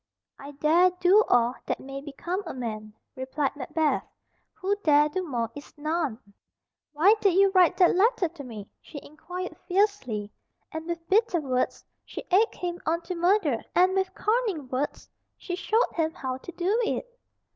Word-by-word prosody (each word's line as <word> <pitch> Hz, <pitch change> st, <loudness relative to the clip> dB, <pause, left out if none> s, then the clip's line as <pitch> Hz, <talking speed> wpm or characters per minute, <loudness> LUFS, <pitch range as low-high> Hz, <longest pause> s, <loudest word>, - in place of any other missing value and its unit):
"I 285 Hz, +1 st, -9 dB
dare 320 Hz, +6 st, +4 dB
do 380 Hz, +5 st, +6 dB
all 240 Hz, 0 st, +4 dB
that -, -, -1 dB
may 275 Hz, +1 st, -7 dB
become 330 Hz, +7 st, -4 dB
a -, -, -6 dB
man," 215 Hz, -4 st, -6 dB, 0.2 s
replied 265 Hz, +2 st, -2 dB
Macbeth; 300 Hz, +1 st, 0 dB, 0.5 s
"who 390 Hz, +2 st, -1 dB
dare 295 Hz, -6 st, +4 dB
do 370 Hz, +5 st, -2 dB
more 235 Hz, -8 st, -3 dB
is 290 Hz, 0 st, -12 dB
none." 305 Hz, -5 st, -1 dB, 0.7 s
"Why 335 Hz, +8 st, +5 dB
did 395 Hz, -4 st, +3 dB
you 390 Hz, 0 st, +5 dB
write 370 Hz, -3 st, +4 dB
that 360 Hz, -1 st, +5 dB
letter 420 Hz, 0 st, +3 dB
to 310 Hz, -3 st, -11 dB
me?" 215 Hz, -6 st, -9 dB
she 290 Hz, -, -9 dB
inquired 355 Hz, +4 st, -7 dB
fiercely, 355 Hz, -, 0 dB, 0.4 s
and 320 Hz, 0 st, -6 dB
with 335 Hz, -1 st, -5 dB
bitter 405 Hz, -2 st, +3 dB
words 255 Hz, -4 st, -2 dB, 0.2 s
she -, -, -8 dB
egged 420 Hz, +5 st, +3 dB
him 350 Hz, 0 st, -4 dB
on 335 Hz, +2 st, +1 dB
to 365 Hz, -, -5 dB
murder, 345 Hz, -, +2 dB, 0.2 s
and 365 Hz, +1 st, +4 dB
with 380 Hz, -1 st, 0 dB
cunning 420 Hz, -, 0 dB
words 265 Hz, +3 st, -3 dB, 0.3 s
she 355 Hz, -, -5 dB
showed 435 Hz, +5 st, +1 dB
him 320 Hz, -1 st, 0 dB
how 255 Hz, -1 st, -4 dB
to 350 Hz, -, -9 dB
do 375 Hz, +6 st, 0 dB
it. 450 Hz, -, -1 dB
335 Hz, 165 wpm, -26 LUFS, 275-375 Hz, 0.7 s, do